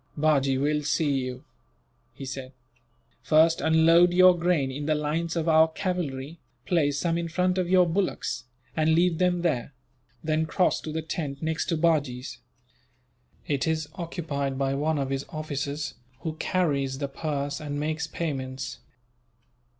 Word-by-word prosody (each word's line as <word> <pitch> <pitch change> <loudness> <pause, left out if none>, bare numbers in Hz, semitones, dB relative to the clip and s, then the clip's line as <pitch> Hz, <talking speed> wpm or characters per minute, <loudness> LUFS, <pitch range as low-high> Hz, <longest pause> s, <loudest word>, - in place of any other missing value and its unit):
"Bajee 140 -3 +2
will 150 +2 +1
see 150 0 +1
you," 130 -2 -2 0.7
he 135 - -9
said. 130 0 -6 0.7
"First 160 +1 +4
unload 165 +2 +5
your 185 0 +7
grain 170 -6 +1
in 145 +2 -5
the 155 - +3
lines 160 +3 -1
of 165 -1 -1
our 160 0 +6
cavalry, 160 -4 -3 0.3
place 145 -5 +1
some 170 +2 0
in 170 - -2
front 180 +2 +1
of 180 -1 -1
your 185 -1 +6
bullocks, 165 -9 -1 0.3
and 160 0 +3
leave 170 -1 +2
them 180 -1 +2
there; 140 -5 -1 0.5
then 155 0 0
cross 180 +2 +1
to 155 - -6
the 160 +1 -3
tent 150 -3 -4
next 160 0 -1
to 165 - 0
Bajee's. 145 -6 0 1.1
It 140 +1 -1
is 160 -2 -1
occupied 155 -6 -3
by 135 0 0
one 150 +3 0
of 135 -1 -2
his 135 0 -1
officers, 145 -1 -4 0.3
who 160 - -3
carries 140 -8 0
the 140 0 -2
purse 140 0 -3
and 145 -1 -4
makes 155 +1 -2
payments. 135 -5 -4
155 Hz, 150 wpm, -26 LUFS, 140-165 Hz, 1.1 s, your